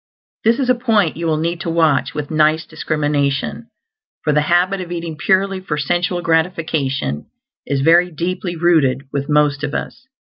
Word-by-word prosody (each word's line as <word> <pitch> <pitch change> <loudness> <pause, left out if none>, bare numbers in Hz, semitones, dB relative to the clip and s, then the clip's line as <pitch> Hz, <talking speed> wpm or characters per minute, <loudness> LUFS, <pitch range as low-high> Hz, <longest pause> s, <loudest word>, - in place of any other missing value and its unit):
This 230 +2 +3
is 270 - -1
a 250 - +5
point 225 -8 +1
you 170 0 -3
will 155 -1 +1
need 170 +2 -2
to 180 - -3
watch 165 -3 +1
with 150 0 -4
nice 155 +1 +2
discrimination, 150 +4 -2 0.6
for 150 - +1
the 150 - +3
habit 180 +5 +1
of 175 -1 -7
eating 170 -2 -4
purely 195 +3 +1
for 155 -5 -4
sensual 175 +4 -1
gratification 160 - -1 0.4
is 140 -1 0
very 170 +4 +5
deeply 175 +2 -3
rooted 155 -6 +2
with 140 +1 -3
most 150 -1 +2
of 145 - -3
us. 265 -1 -6
165 Hz, 170 wpm, -18 LUFS, 150-180 Hz, 0.6 s, a